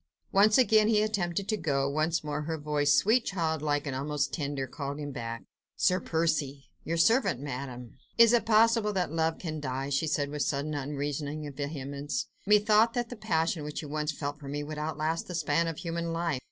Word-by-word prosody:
Once 210 +2 +5
again 220 -4 +5
he 215 -1 +3
attempted 200 -3 -1
to 215 - +1
go, 140 -7 0
once 155 +3 0
more 150 0 -3
her 160 0 -2
voice, 145 -1 +2
sweet, 225 - +4
childlike, 160 -5 -1
almost 140 +1 -2
tender, 140 -4 -2
called 140 +2 -5
him 145 -1 -5
back. 115 -2 -5 0.3
"Sir 185 0 +2
Percy." 155 -5 -1
"Your 165 +1 -2
servant, 225 - +3
Madame." 125 -3 -6 0.2
"Is 230 0 +7
it 240 - +4
possible 225 -1 +4
that 180 -5 -1
love 160 0 0
can 155 -3 -5
die?" 135 -1 -3
she 140 +3 0
said 145 -2 0
with 150 0 -3
sudden, 145 +2 -1
unreasoning 145 +1 -3
vehemence. 145 - -4 0.2
"Methought 210 +2 +4
that 240 -1 -1
the 245 - -6
passion 165 -5 0
which 150 +2 -5
you 150 - -7
once 150 +1 -1
felt 145 -1 -5
for 140 - -10
me 145 +1 -3
would 150 0 -6
outlast 155 +1 -2
the 180 - -5
span 165 +1 +1
of 165 -2 -4
human 170 -1 -3
life. 165 -4 -1
155 Hz, 190 wpm, -29 LUFS, 145-175 Hz, 0.3 s, Is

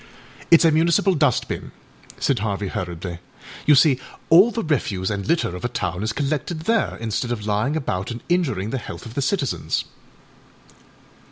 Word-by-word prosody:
â 170 - +10
âItâs 165 - +2
a 165 - +6
municipal 170 +5 +3
dust 150 -7 +2
bin,â - - -5 0.5
said 135 -5 +1
Harvey 100 -2 -2
hurriedly; 85 -1 -5 0.5
âyou 150 -2 +7
see 135 -2 +5 0.3
all 185 +8 +8
the 230 -1 -3
refuse 105 - -1
and 100 -1 -3
litter 160 - +1
of 90 - -8
a - - +1
town 90 -6 -3
is 110 +1 -1
collected 145 +6 -2
there, 225 +7 0
instead 115 +2 -2
of 105 -4 -3
lying 105 +8 0
about 100 -11 -2
and 120 0 -6
injuring 135 - 0
the 135 - -2
health - - -8
of 115 - -9
the 140 - -1
citizens. 140 -1 -1
130 Hz, 175 wpm, -22 LUFS, 105-160 Hz, 0.5 s, â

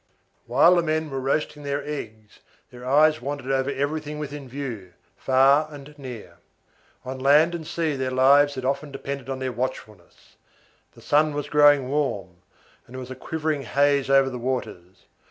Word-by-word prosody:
While 145 +9 +5
the - - +4
men 155 -2 -2
were 135 - -3
roasting 150 +2 -2
their 140 0 -3
eggs, 110 -8 -8 0.3
their 125 0 -12
eyes 155 +2 +4
wandered 140 0 -4
over 135 0 0
everything 145 +2 -3
within 145 -2 -7
view, 120 -9 -6 0.2
far 135 +3 +3
and 145 0 -11
near. 125 -5 -9 0.7
On 130 +1 -6
land 150 +5 +4
and 165 -2 -6
sea 160 -3 -1
their 130 -1 -2
lives 140 +3 +4
had 130 -1 -5
often 140 +2 -2
depended 140 0 -6
on 135 - -3
their 130 -1 -3
watchfulness. 110 -7 -7 0.6
The - - -17
sun 150 0 +2
was 145 - -4
growing 145 -3 +5
warm, 105 -11 -2 0.5
and 125 - -13
there - - -5
was 130 0 -8
a - - -6
quivering 155 +2 -3
haze 140 +3 +1
over 135 -1 +4
the 125 - -6
waters. 115 -8 -5
140 Hz, 170 wpm, -24 LUFS, 130-150 Hz, 0.7 s, While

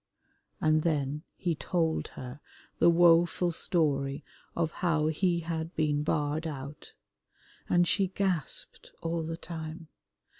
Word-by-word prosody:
And 155 0 +3
then 150 -2 0
he 175 -3 -1
told 165 0 0
her 125 +2 -7 0.4
the 170 - +6
woful 170 +1 +5
story 140 -5 0 0.3
of 165 -2 0
how 160 -3 +2
he 170 +2 +1
had 160 0 -4
been 150 -2 +1
barred 150 +1 0
out, 140 -1 -8 0.7
and 175 0 +4
she 195 +1 +2
gasped 185 -4 -2
all 165 0 -1
the 165 +1 -4
time. 160 -1 -7
160 Hz, 120 wpm, -30 LUFS, 150-170 Hz, 0.7 s, the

